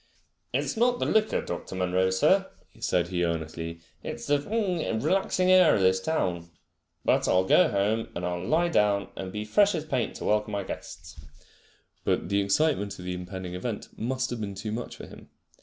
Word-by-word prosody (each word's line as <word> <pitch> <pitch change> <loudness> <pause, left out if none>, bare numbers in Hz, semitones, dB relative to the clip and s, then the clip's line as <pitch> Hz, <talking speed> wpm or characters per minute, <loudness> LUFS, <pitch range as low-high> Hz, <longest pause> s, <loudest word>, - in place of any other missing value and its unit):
It's 140 +2 -1
not 245 +2 +3
the - - -1
liquor, 220 0 +2
Dr. 85 +2 -6
Munro, 95 0 +1
sir," 95 0 +3 0.3
said 85 -1 0
he 90 -1 0
earnestly. 85 0 -3 0.2
It's - - -6
the 145 0 +2
relaxing 185 - 0
air 185 -2 +7
of 100 - +1
this 95 0 +3
town. 90 - -1 0.6
But - - +3
I'll 95 0 +4
go 165 - +5
home 105 +3 0
and 85 - -3 0.2
lie 160 +3 +3
I'll 170 - -1
down, 100 -6 +2
and 95 -1 -5
be 105 +2 -4
as 105 - -13
fresh 205 - +4
as 155 -2 -3
paint 130 -6 -1
to - - -6
welcome 105 0 +1
my 100 -1 -1
guests." - - -9 0.8
But - - 0
the 100 0 +2
excitement 100 -1 +1
of 90 - -9
the 90 - -2
impending 90 0 -6
event 105 +4 -4
must 130 +3 -2
have 120 -2 -4
been 100 -2 -4
too 105 +2 -5
much 120 +3 -5
for - - -9
him. - - -14
105 Hz, 190 wpm, -27 LUFS, 95-150 Hz, 0.8 s, air